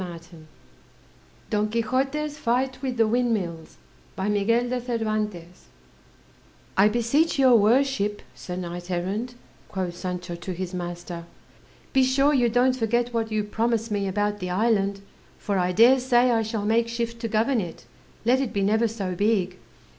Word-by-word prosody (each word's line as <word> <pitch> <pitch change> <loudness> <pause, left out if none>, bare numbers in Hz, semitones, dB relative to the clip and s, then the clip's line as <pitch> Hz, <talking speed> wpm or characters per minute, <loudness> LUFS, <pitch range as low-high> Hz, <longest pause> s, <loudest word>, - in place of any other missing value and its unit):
_ - - -2
HENRY 175 -2 -6 0.2
NEWBOLT 160 -2 -14 1.1
DON 210 0 +1
QUIXOTE'S 270 +7 -1
FIGHT 255 +2 0
WITH 260 -3 -3
THE 225 - +4
WINDMILLS 215 -9 -1 3.0
"I 195 +2 +6
beseech 240 +9 +1
your 260 -3 +6
worship, 220 -1 +2
Sir 180 - -7
Knight 175 0 -6
errant," 200 +8 -2 0.3
quoth 185 -3 -3
Sancho 180 -1 -5
to 175 +2 -5
his 180 +1 -5
master, 175 -1 -6 0.7
"be 265 - +5
sure 275 +3 +3
you 245 -4 +3
don't 250 +2 +3
forget 240 0 0
what 225 -1 -1
you 215 -1 0
promised 225 +1 -1
me 200 -1 0
about 205 +2 -1
the 180 -1 -4
island; 200 0 +1 0.4
for 200 -2 -1
I 180 0 +1
dare 235 +8 +6
say 250 -1 +3
I 225 -1 +2
shall 220 -1 -3
make 230 +2 +2
shift 235 0 -3
to 230 - -1
govern 225 +3 +1
it, 170 -3 -8 0.4
let 255 +3 +4
it 265 - -2
be 200 - -1
never 220 +3 +3
so 200 -4 -4
big." 190 -2 0
220 Hz, 150 wpm, -25 LUFS, 185-245 Hz, 3.0 s, I